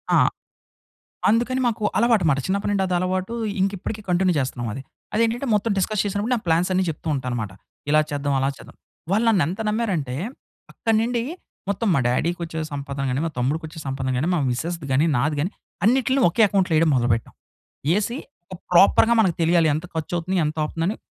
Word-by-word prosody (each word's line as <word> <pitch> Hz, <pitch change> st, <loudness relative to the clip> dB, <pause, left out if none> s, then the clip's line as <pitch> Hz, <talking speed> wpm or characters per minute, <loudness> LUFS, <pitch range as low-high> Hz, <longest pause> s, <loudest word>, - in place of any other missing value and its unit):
ఆ! -, -, +6 dB, 1.1 s
అందుకని 240 Hz, +4 st, +2 dB
మాకు 225 Hz, -2 st, -1 dB
అలవాటు 230 Hz, -5 st, +3 dB
అనమాట. 140 Hz, -3 st, +3 dB
చిన్నప్పటి 200 Hz, +2 st, -1 dB
నుండి 195 Hz, -1 st, +1 dB
అది 180 Hz, -, -1 dB
అలవాటు. 185 Hz, +4 st, -1 dB, 0.3 s
ఇంకా 195 Hz, +1 st, +2 dB
ఇప్పటికి 215 Hz, +3 st, -5 dB
కంటిన్యూ 180 Hz, 0 st, +2 dB
చేస్తున్నాం 125 Hz, -2 st, -3 dB
అది. 135 Hz, -, -6 dB, 0.3 s
అది 225 Hz, -, +3 dB
ఏంటంటే, 240 Hz, +4 st, -1 dB
మొత్తం 210 Hz, +2 st, +1 dB
డిస్కస్ 210 Hz, +2 st, 0 dB
చేసినప్పుడు, 205 Hz, +4 st, -1 dB
నా -, -, -4 dB
ప్లాన్స్ 170 Hz, +2 st, +2 dB
అన్ని 185 Hz, 0 st, +2 dB
చెప్తూ 160 Hz, +1 st, -6 dB
ఉంటా 130 Hz, -2 st, -4 dB
అనమాట. 110 Hz, -5 st, -3 dB, 0.4 s
ఇలా 155 Hz, 0 st, +5 dB
చేద్దాం, 145 Hz, -1 st, -1 dB
అలా 135 Hz, +1 st, +1 dB
చేద్దాం. -, -, -14 dB, 0.3 s
వాళ్ళు 215 Hz, +4 st, +2 dB
నన్ను 200 Hz, -8 st, +4 dB
ఎంత 185 Hz, +6 st, -4 dB
నమ్మారంటే, 190 Hz, -, -1 dB, 0.6 s
అక్కడి 225 Hz, -1 st, 0 dB
నుండి 235 Hz, 0 st, 0 dB, 0.5 s
మొత్తం 200 Hz, +2 st, 0 dB
మా -, -, +3 dB
డ్యాడీకొచ్చే 165 Hz, +4 st, -1 dB
సంపాదన 140 Hz, -1 st, -4 dB
గాని, 130 Hz, +3 st, -1 dB
మా -, -, -2 dB
తమ్ముడికి 145 Hz, +6 st, 0 dB
వచ్చే 160 Hz, +1 st, -11 dB
సంపాదన 135 Hz, -1 st, -2 dB
గాని, 145 Hz, +7 st, 0 dB
మా -, -, +1 dB
మిసెస్‌ది 160 Hz, +4 st, -3 dB
గాని, 145 Hz, +5 st, +3 dB
నాది 145 Hz, +4 st, +1 dB
గాని 175 Hz, +6 st, -1 dB, 0.3 s
అన్నిట్లని 260 Hz, +3 st, +3 dB
ఒకే 180 Hz, +7 st, +2 dB
అకౌంట్‌లో 185 Hz, -4 st, +1 dB
వేయడం 160 Hz, 0 st, +4 dB
మొదలుపెట్టాం. 120 Hz, -2 st, 0 dB, 0.6 s
యేసీ, 215 Hz, +8 st, +1 dB, 0.4 s
ఒక -, -, -10 dB, 0.2 s
ప్రాపర్‌గా 225 Hz, +6 st, +6 dB
మనకు 185 Hz, -6 st, +2 dB
తెలియాలి 165 Hz, -1 st, +4 dB
ఎంత 160 Hz, +3 st, -3 dB
ఖర్చు 160 Hz, +1 st, -4 dB
అవుతుంది, 185 Hz, +3 st, -2 dB
ఎంత 155 Hz, +1 st, -3 dB
అవుతుంది 165 Hz, +2 st, -3 dB
అని 215 Hz, -, -2 dB
175 Hz, 190 wpm, -23 LUFS, 150-210 Hz, 1.1 s, ఆ